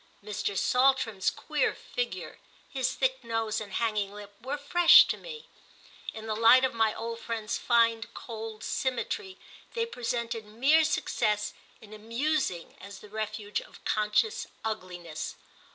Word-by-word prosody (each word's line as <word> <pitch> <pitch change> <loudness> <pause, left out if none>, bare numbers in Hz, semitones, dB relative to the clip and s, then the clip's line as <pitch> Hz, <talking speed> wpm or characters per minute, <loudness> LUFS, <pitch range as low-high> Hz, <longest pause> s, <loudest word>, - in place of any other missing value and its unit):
Mr. 205 -1 -3
Saltram's 250 -6 +3
queer - - -1
figure, - - -5 0.3
his 260 -2 -1
thick 260 -1 0
nose 225 -2 -1
and 200 -3 -8
hanging 215 -4 0
lip, 205 0 -10
were 270 +4 -3
fresh 340 +5 +7
to - - -1
me: 465 -2 -10 0.6
in 220 0 -8
the 220 - -1
light 230 +4 +7
of 260 - -1
my 225 -1 +3
old 230 0 -5
friend's 225 -2 -3
fine 230 -1 +3
cold 220 -1 -7
symmetry 265 - -2 0.4
they 460 -1 +1
presented 235 - -3
mere 275 +9 +4
success 210 -8 0 0.3
in 215 -1 -13
amusing 230 - -2
as 200 +1 -9
the 210 - -13
refuge 215 -1 -3
of - - -16
conscious 215 - +1 0.2
ugliness. 180 -7 -5
225 Hz, 135 wpm, -29 LUFS, 210-260 Hz, 0.6 s, fresh